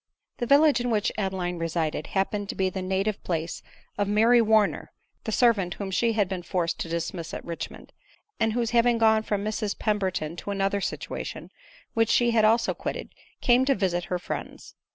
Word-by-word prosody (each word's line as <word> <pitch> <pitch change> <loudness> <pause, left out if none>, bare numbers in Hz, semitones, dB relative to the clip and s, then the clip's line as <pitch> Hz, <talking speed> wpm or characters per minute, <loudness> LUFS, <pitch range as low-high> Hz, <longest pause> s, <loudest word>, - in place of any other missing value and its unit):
The 240 - -2
village 280 -1 +5
in 245 - -1
which 215 -3 +1
Adeline 185 -3 -2
resided 165 -1 -2
happened 200 +1 -1
to - - -3
be 190 -1 0
the 190 - -4
native 190 +3 -1
place 165 -1 -3 0.4
of 205 - +1
Mary 225 +4 +5
Warner, 215 -2 +2 0.3
the 220 - -2
servant 210 -7 +2
whom 195 -2 -5
she 230 +4 +2
had 210 -3 +2
been 185 -1 -4
forced 170 -1 -2
to 165 - -4
dismiss 170 0 -4
at - - -7
Richmond; 170 -1 -7 0.5
and 225 -1 +2
who 240 0 0
hav 235 +1 +3
ing 240 -1 +3
gone 220 -1 +4
from 205 -2 -2
Mrs 215 -1 -2
Pemberton 190 -7 -1
to 205 - -7
another 200 0 0
situation, - - -5 0.4
which 225 -1 +3
die 240 -1 +2
bad 220 -2 +4
also 225 +2 +3
quitted, - - -5 0.3
came 245 +1 +4
to 275 - +3
visit 175 -3 0
her 180 - -2
friends. 175 - -7
205 Hz, 190 wpm, -26 LUFS, 185-225 Hz, 0.5 s, village